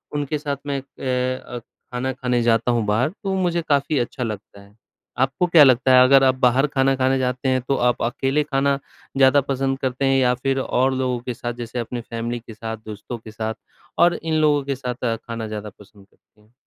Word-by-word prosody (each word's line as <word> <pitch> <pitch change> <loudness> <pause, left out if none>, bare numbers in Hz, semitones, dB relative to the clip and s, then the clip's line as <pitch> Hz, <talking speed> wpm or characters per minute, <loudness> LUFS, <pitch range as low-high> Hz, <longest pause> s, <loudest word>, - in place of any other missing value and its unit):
उनके 145 +1 -1
साथ 145 -1 -3
मैं 140 -1 -1
एक 135 - -7
ए 130 -1 0
अ, 120 - -6
खाना 125 +2 -6
खाने 125 -1 -1
जाता 115 +1 +2
हूँ 115 -2 0
बाहर, 110 +7 +1
तो 195 +3 -7
वो 190 - 0
मुझे 175 -1 0
काफ़ी 145 0 +2
अच्छा 125 +1 -3
लगता 105 -2 -7
है। 100 +1 -20 0.4
आपको 135 +6 +1
क्या 170 -3 +7
लगता 130 -1 +4
है, 125 - +8
अगर 135 +1 +6
आप 130 -1 +4
बाहर 130 +2 +3
खाना 135 -1 +1
खाने 130 0 +1
जाते 125 +1 -1
हैं 130 0 +1
तो 140 - +2
आप 120 - -2
अकेले 135 +5 0
खाना 140 -1 +1 0.4
ज़्यादा 135 +1 +5
पसंद 135 0 -1
करते 130 0 -1
हैं 135 0 +3
या 125 -1 +3
फिर 135 +2 -1
और 130 0 +1
लोगों 130 -1 -1
के 125 +1 -5
साथ? 120 +1 -5
जैसे 120 +1 -6
अपनी 120 +1 -4
फ़ैमिली 115 +1 -4
के 115 -1 -12
साथ, 110 +1 -6
दोस्तों 110 +3 -7
के 110 -1 -12
साथ 110 0 -4 0.4
और 175 0 +5
इन 160 0 -4
लोगों 145 -2 +3
के 140 0 -2
साथ 125 -2 -3
खाना 115 -1 -4
ज़्यादा 105 -1 -6
पसंद 100 -1 -17
करते 105 - -33
हैं? 105 +2 -28
130 Hz, 220 wpm, -22 LUFS, 120-135 Hz, 0.4 s, है